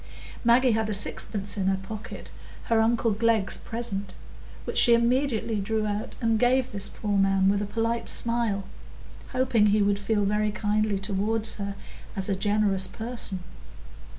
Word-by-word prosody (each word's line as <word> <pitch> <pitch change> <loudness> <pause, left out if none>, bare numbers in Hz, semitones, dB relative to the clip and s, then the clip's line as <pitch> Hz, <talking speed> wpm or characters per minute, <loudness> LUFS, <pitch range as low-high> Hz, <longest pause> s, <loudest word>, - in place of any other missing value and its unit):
Maggie 245 +2 +4
had 220 0 0
a 210 - +1
sixpence 200 0 -1
in 190 -1 -1
her 190 0 +2
pocket,—her 220 +3 -5
uncle 230 0 +1
Glegg's 215 -2 +1
present,—which 205 -4 -5
she 235 -2 +7
immediately 235 -2 0
drew 215 +2 -1
out 210 0 -4
and 225 -2 +1
gave 255 +1 +2
this 200 -2 -2
poor 205 -2 -3
man 195 0 +3
with 200 0 +1
a 205 - -3
polite 230 +2 -2
smile, 230 -4 0 0.7
hoping 250 -4 +2
he 210 0 +3
would 200 0 +1
feel 205 0 0
very 210 +1 +1
kindly 210 0 0
toward 205 +3 -2
her 200 -2 -3 0.4
as 195 0 0
a 195 - +1
generous 200 -1 +1
person. 220 -3 0
215 Hz, 150 wpm, -26 LUFS, 200-230 Hz, 0.7 s, she